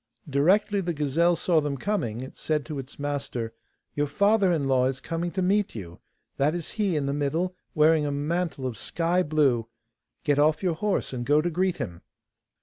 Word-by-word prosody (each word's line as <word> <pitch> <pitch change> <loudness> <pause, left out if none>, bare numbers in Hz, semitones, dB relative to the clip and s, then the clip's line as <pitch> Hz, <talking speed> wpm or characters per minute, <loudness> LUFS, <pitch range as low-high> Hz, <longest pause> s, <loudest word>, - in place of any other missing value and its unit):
Directly 190 +9 +3
the 175 -2 -2
gazelle 155 +4 +2
saw 165 -1 +2
them 145 -2 -2
coming, 125 - -2
it 130 - -8
said 155 -2 -1
to 150 -4 -5
its 135 0 -9
master: 140 -5 -3 0.4
'Your 145 0 0
father 200 +5 +3
in 160 -4 +1
law 130 -2 +3
is 130 -1 -2
coming 165 +5 -3
to 190 - 0
meet 200 - +1
you; 85 -5 -8 0.4
that 150 +4 +2
is 170 -3 -4
he 205 -5 0
in 145 -2 0
the 140 - -1
middle, 155 +6 -1 0.2
wearing 155 -1 +4
a - - -1
mantle 155 0 -2
of 125 -3 -4
sky 175 +2 0
blue. 145 -8 +2 0.6
Get 145 -1 +2
off 155 +3 +3
your 180 -3 +2
horse 195 -2 -1
and 120 -1 -3
go 145 +4 +4
to 175 +3 0
greet 185 +2 +1
him. 95 - -5
150 Hz, 195 wpm, -26 LUFS, 140-175 Hz, 0.6 s, wearing